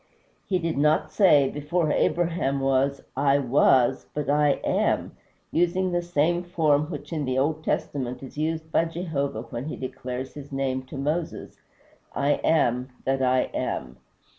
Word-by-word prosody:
He 190 - +2
did 165 -4 -2
not 150 +1 +2
say, 150 -9 +5
"Before 150 +3 -1
Abraham 165 -6 +1
was, 135 +1 +1
I 140 +1 +3
was," 130 -1 +3
but 145 -1 -1
"I 145 -1 +4
AM," - - 0 0.4
using 180 +2 +1
the 175 0 +1
same 175 0 +1
form 155 -4 +1
which 150 -2 -7
in 155 -2 -1
the 130 -1 -1
Old 155 +3 0
Testament 130 -4 -2
is 130 - -10
used 160 +1 -2
by 165 - +3
Jehovah 160 -8 -3
when 120 +2 -6
he 155 - -4
declares 130 0 -6
his 145 -1 -10
name 135 -1 -1
to 140 - -8
Moses, 155 +5 -3 0.6
"I 140 +1 +1
AM 125 -5 +2 0.2
that 135 0 +1
I 130 0 +2
am." 65 0 -3
145 Hz, 155 wpm, -25 LUFS, 135-165 Hz, 0.6 s, say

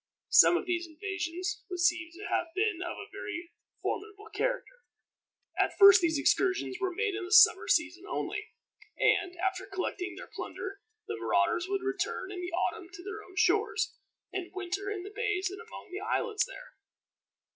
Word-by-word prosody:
Some 380 -3 +8
of - - -4
these 350 -1 -1
invasions 365 +3 -4
would 360 -1 -4
seem 340 -2 +2
to 400 +4 -9
have 345 - 0
been 400 -3 +1
of 345 - -4
a 410 - -9
very 350 -4 -6 0.3
formidable 420 +1 -4
character. - - -2 0.8
At - - +1
first 395 -2 +9
these 320 -3 +2
excursions 375 +5 +2
were 375 -1 +1
made 420 +3 -1
in 400 0 -3
the 360 - -7
summer 430 0 +7
season 340 +4 +1
only, 425 +1 -3 0.5
and, 360 0 +2
after 380 +1 -1
collecting 375 -1 -3
their - - -8
plunder, 395 +1 -6 0.2
the - - -4
marauders 345 +1 +1
would 395 -1 -1
return 390 0 -2
in 365 -2 -5
the 355 0 -4
autumn 350 +2 -2
to 355 -2 -10
their 415 +2 -6
own 370 - -16
shores, 420 +4 +2 0.4
and 365 -2 -4
winter 380 +1 -3
in 400 -3 -4
the 405 +2 -9
bays 400 -5 0
and 395 - -8
among 445 -3 -11
the 370 - -4
islands 440 0 0
there. - - -12
385 Hz, 175 wpm, -30 LUFS, 360-415 Hz, 0.8 s, first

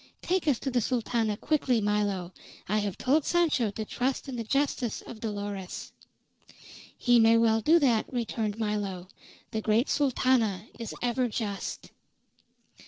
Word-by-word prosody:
"Take 365 -2 0
us 280 -5 +3
to 270 - -2
the 245 -1 +2
Sultana 225 -3 0
quickly, 265 -5 +1
Milo. 205 -4 -1 0.3
I 215 +2 +1
have 205 -3 -3
told 280 +4 +2
Sancho 310 -10 +2
to 215 +2 -5
trust 255 +5 -2
in 265 - -5
the 230 - -3
justice 260 -1 -1
of 230 - -10
Dolores." 205 -4 -5 1.1
"He 245 -1 +4
may 225 0 +6
well 225 -1 +3
do 320 +8 +5
that," 245 -8 +2
returned 225 -4 -2
Milo. 205 -4 -3 0.4
"The 220 -2 -2
great 220 +5 +2
Sultana 250 - +2
is 230 - -5
ever 245 +1 +1
just." 210 -3 -4
230 Hz, 145 wpm, -28 LUFS, 210-255 Hz, 1.1 s, may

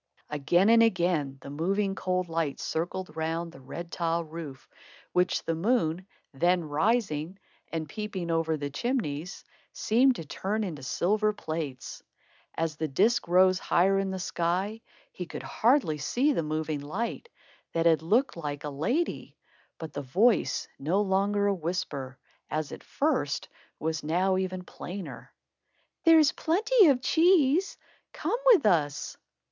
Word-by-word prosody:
Again 175 +7 +3
and 230 0 +7
again 170 -10 +1
the 140 - -9
moving, 195 +6 0
cold 185 -1 -1
light 165 -3 -2
circled 175 +2 -3
round 165 +1 -2
the 150 - -14
red 170 +6 -8
tile 170 0 -1
roof, 155 -4 -9 0.4
which 180 0 +1
the 165 - -1
moon, 180 -1 0 0.3
then 175 +5 +2
rising 160 +1 0 0.3
and 160 -2 -3
peeping 190 -1 -4
over 165 -1 +1
the 145 -1 -4
chimneys, 180 - -3 0.3
seemed 250 +4 +3
to 165 - -7
turn 210 +8 -2
into 165 -8 -5
silver 210 +10 +1
plates. 155 -8 -5 0.5
As 165 -2 -2
the 155 - -1
disc 195 - +2
rose 185 +1 +4
higher 195 +3 +2
in 195 0 -1
the 190 - -3
sky, 185 +5 -2 0.3
he 180 - -7
could - - -7
hardly 230 - +2
see 260 - +1
the 170 - 0
moving 155 -1 -2
light, 220 - -4 0.4
that 165 0 0
had 165 -2 +4
looked 225 +12 +2
like 145 -4 -5
a 150 - -4
lady; 240 - -2 0.4
but 160 -2 -8
the 145 - -4
voice, 200 - +2
no 170 +9 +1
longer 200 +1 +1
a 200 - +3
whisper, 160 -7 -4 0.3
as 155 -1 -2
at - - -9
first, - - -1 0.3
was 160 -1 -2
now 180 +5 +1
even 185 -1 -2
plainer: 185 +1 -8 0.7
"There's 320 -3 +7
plenty 415 +5 +3
of 260 -3 +3
cheese. 335 +2 +3 0.4
Come 470 - -2
with 380 - +5
us." 150 -7 +1
175 Hz, 145 wpm, -28 LUFS, 155-210 Hz, 0.7 s, and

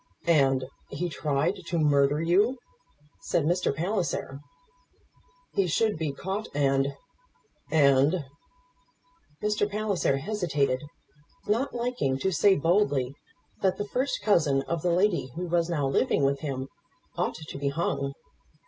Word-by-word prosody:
"And 135 -6 +3 0.2
he 175 +5 -3
tried 150 +4 0
to 170 - -1
murder 145 -1 +3
you!" 195 +10 +2 0.6
said 165 - 0
Mr. 175 +3 +1
Palliser. 165 -4 -2 1.1
"He 195 -2 +2
should 215 +6 +1
be 155 -3 -1
caught 190 +9 -4
and, 135 -1 +1 0.7
and 145 +2 +4 0.6
" 330 - -32
Mr. 210 0 +1
Palliser 200 -9 0
hesitated, 145 -7 0 0.6
not 235 +7 0
liking 235 - -1
to 190 +8 0
say 195 +4 +4
boldly 145 -6 +1 0.5
that 190 -1 +2
the 205 - -2
first 260 +6 -1
cousin 150 -10 +3
of 165 +1 -3
the 180 - +1
lady 180 -4 +2
who 180 +2 -3
was 170 -1 +1
now 150 -5 0
living 135 - +1
with 140 0 +2
him 135 -3 -4 0.5
ought - - -1
to 155 -2 -8
be 140 0 0
hung. 140 -2 -2
165 Hz, 130 wpm, -27 LUFS, 140-195 Hz, 1.1 s, and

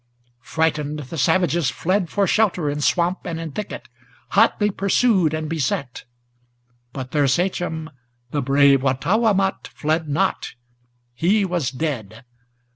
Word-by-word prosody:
Frightened 155 -2 -1
the 150 +2 -7
savages 170 +1 +2
fled 185 0 -1
for 200 -1 +1
shelter 180 -7 +1
in 145 +1 -4
swamp 175 +4 +1
and 165 -2 -4
in 165 -2 -5
thicket, 210 +8 -6 0.4
Hotly 210 0 +3
pursued 195 -3 +2
and 155 0 -3
beset; 140 -5 -3 0.9
but 130 -2 -7
their 145 -2 +2
sachem, 165 +1 -1 0.4
the 145 - -1
brave 140 0 +4
Wattawamat, 190 - +1
Fled 155 +1 -2
not; 145 +2 -1 0.6
he 190 - +2
was 175 -8 -1
dead. 125 -5 -5
160 Hz, 120 wpm, -21 LUFS, 140-185 Hz, 0.9 s, brave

